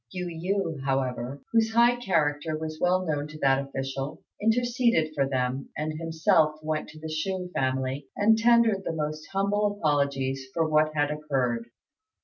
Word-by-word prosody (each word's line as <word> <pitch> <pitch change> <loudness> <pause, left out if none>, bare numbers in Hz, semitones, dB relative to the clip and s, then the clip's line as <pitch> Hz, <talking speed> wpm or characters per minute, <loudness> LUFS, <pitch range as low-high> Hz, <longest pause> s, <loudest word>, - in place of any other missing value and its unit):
Yu 180 -1 -4
yü, 175 -2 -2
however, 135 0 -2
whose 225 -1 +2
high 235 +1 +5
character 155 -8 0
was 155 0 -5
well 185 +1 +2
known 150 -2 -1
to 155 0 -10
that 135 -2 +3
official, 135 0 -5 0.2
interceded 235 - +2
for 135 -2 0
them, 130 0 -1
and 155 +1 -2
himself 160 -1 +2
went 155 0 -2
to 155 - -12
the 160 - -6
Chou 180 +3 -3
family 130 +1 -1
and 215 +2 +5
tendered 230 -3 +4
the 165 - -2
most 155 0 -4
humble 205 +1 +1
apologies 140 -3 0
for 165 -1 +2
what 155 0 +3
had 145 0 +1
occurred. 130 -6 -1
155 Hz, 155 wpm, -27 LUFS, 140-190 Hz, 0.2 s, high